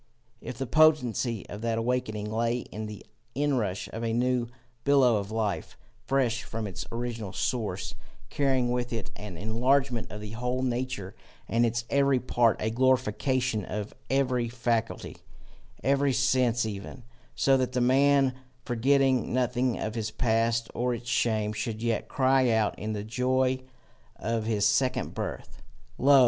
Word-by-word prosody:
"If 120 Hz, -, -7 dB
the 135 Hz, -, -2 dB
potency 125 Hz, -6 st, +3 dB
of 105 Hz, -, -7 dB
that 115 Hz, -1 st, 0 dB
awaking 115 Hz, -3 st, -1 dB
lay 115 Hz, +2 st, 0 dB
in 110 Hz, +1 st, -5 dB
the 105 Hz, -1 st, -9 dB, 0.3 s
inrush 125 Hz, -10 st, 0 dB
of 115 Hz, -, -4 dB
a 115 Hz, -1 st, 0 dB
new 125 Hz, 0 st, +1 dB, 0.4 s
billow 135 Hz, -5 st, +5 dB
of 100 Hz, -1 st, -4 dB
life, 110 Hz, -2 st, -2 dB, 0.3 s
fresh 125 Hz, -3 st, +1 dB
from 115 Hz, -1 st, -5 dB
its 95 Hz, -4 st, -6 dB
original 115 Hz, -4 st, -4 dB
source, 110 Hz, -7 st, -2 dB, 0.4 s
carrying 130 Hz, -3 st, +2 dB
with 120 Hz, 0 st, -1 dB
it 115 Hz, -3 st, -4 dB
an 100 Hz, -5 st, -8 dB
enlargement 120 Hz, +5 st, +1 dB
of 105 Hz, -, -6 dB
the 105 Hz, 0 st, -7 dB
whole 125 Hz, +3 st, -2 dB
nature 125 Hz, -6 st, -2 dB, 0.3 s
and 120 Hz, +1 st, +3 dB
its 115 Hz, 0 st, -2 dB
every 140 Hz, -2 st, +3 dB
part, 120 Hz, -2 st, +2 dB
a 110 Hz, -, -1 dB
glorification 130 Hz, -1 st, +1 dB
of 105 Hz, +2 st, -5 dB, 0.2 s
every 130 Hz, -3 st, +1 dB
faculty, 115 Hz, -1 st, -2 dB, 0.7 s
every 140 Hz, 0 st, +3 dB
sense 125 Hz, -2 st, +2 dB
even, 105 Hz, +4 st, -6 dB, 0.3 s
so 135 Hz, -, +4 dB
that 130 Hz, -1 st, -1 dB
the 125 Hz, -, +1 dB
man, 135 Hz, +1 st, +4 dB, 0.3 s
forgetting 130 Hz, +1 st, +2 dB
nothing 125 Hz, -1 st, +1 dB
of 110 Hz, -, -3 dB
his 110 Hz, -2 st, -2 dB
past 115 Hz, +1 st, +1 dB
or 125 Hz, 0 st, 0 dB
its 120 Hz, +1 st, -8 dB
shame, 110 Hz, -3 st, +1 dB
should 110 Hz, 0 st, -4 dB
yet 115 Hz, -2 st, 0 dB
cry 130 Hz, -1 st, +3 dB
out 110 Hz, -2 st, +2 dB
in 110 Hz, +1 st, -3 dB
the 105 Hz, -1 st, -3 dB
joy 130 Hz, +3 st, +1 dB, 0.6 s
of 115 Hz, -1 st, -2 dB
his 105 Hz, -2 st, +1 dB
second 125 Hz, +5 st, +1 dB
birth: -, -, -6 dB, 0.4 s
'Lo! 140 Hz, +1 st, +7 dB
120 Hz, 150 wpm, -28 LUFS, 110-130 Hz, 0.7 s, Lo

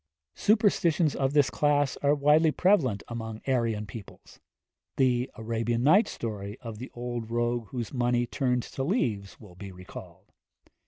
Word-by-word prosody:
Superstitions 180 Hz, -, +2 dB
of 135 Hz, 0 st, 0 dB
this 145 Hz, -4 st, +3 dB
class 145 Hz, -2 st, +1 dB
are 145 Hz, +1 st, +2 dB
widely 150 Hz, +3 st, +4 dB
prevalent 150 Hz, -, +2 dB
among 110 Hz, -2 st, -6 dB
Aryan 115 Hz, -5 st, 0 dB
peoples. 105 Hz, 0 st, -12 dB, 0.6 s
The 125 Hz, -1 st, +2 dB
'Arabian 115 Hz, +1 st, -2 dB
Nights' 185 Hz, -, +5 dB
story 105 Hz, -1 st, -5 dB
of 115 Hz, -4 st, -8 dB
the 130 Hz, -, -7 dB
old 120 Hz, -2 st, -5 dB
rogue 120 Hz, -1 st, -1 dB
whose 120 Hz, 0 st, -5 dB
money 120 Hz, -1 st, +1 dB
turned 125 Hz, -1 st, -1 dB
to 135 Hz, -, -5 dB
leaves 115 Hz, -, -1 dB
will 100 Hz, -5 st, -14 dB
be 95 Hz, +2 st, -9 dB
recalled. 90 Hz, 0 st, -12 dB
120 Hz, 145 wpm, -28 LUFS, 110-145 Hz, 0.6 s, Nights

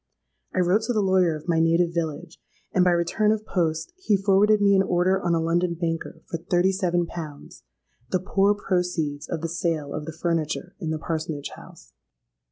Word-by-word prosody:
I 185 Hz, -, +3 dB
wrote 180 Hz, +5 st, +3 dB
to 245 Hz, -, 0 dB
the 215 Hz, -, +1 dB
lawyer 185 Hz, -4 st, +3 dB
of 155 Hz, +2 st, -10 dB
my 165 Hz, -2 st, +2 dB
native 165 Hz, +1 st, +3 dB
village; 165 Hz, 0 st, -4 dB, 0.3 s
and 185 Hz, -, +4 dB
by 180 Hz, -, +4 dB
return 175 Hz, +5 st, +2 dB
of 215 Hz, 0 st, -1 dB
post 165 Hz, -, -1 dB
he 215 Hz, -, +2 dB
forwarded 200 Hz, +2 st, +4 dB
me 200 Hz, -1 st, +4 dB
an 190 Hz, -, +5 dB
order 185 Hz, +1 st, +2 dB
on 175 Hz, -2 st, +1 dB
a -, -, +1 dB
London 170 Hz, +1 st, +1 dB
banker 165 Hz, -1 st, -4 dB
for 165 Hz, -, -5 dB
thirty 175 Hz, +2 st, +2 dB
seven 175 Hz, -3 st, 0 dB
pounds—the 155 Hz, -2 st, -8 dB
poor 200 Hz, +2 st, +2 dB
proceeds 175 Hz, -7 st, -2 dB
of 165 Hz, -3 st, -3 dB
the 165 Hz, -, -2 dB
sale 165 Hz, -3 st, -2 dB
of 150 Hz, -, -4 dB
the 160 Hz, 0 st, -8 dB
furniture 170 Hz, +1 st, -1 dB
in 165 Hz, -5 st, -3 dB
the 160 Hz, -, -1 dB
parsonage 155 Hz, -2 st, -4 dB
house. -, -, -15 dB
175 Hz, 185 wpm, -25 LUFS, 165-190 Hz, 0.3 s, an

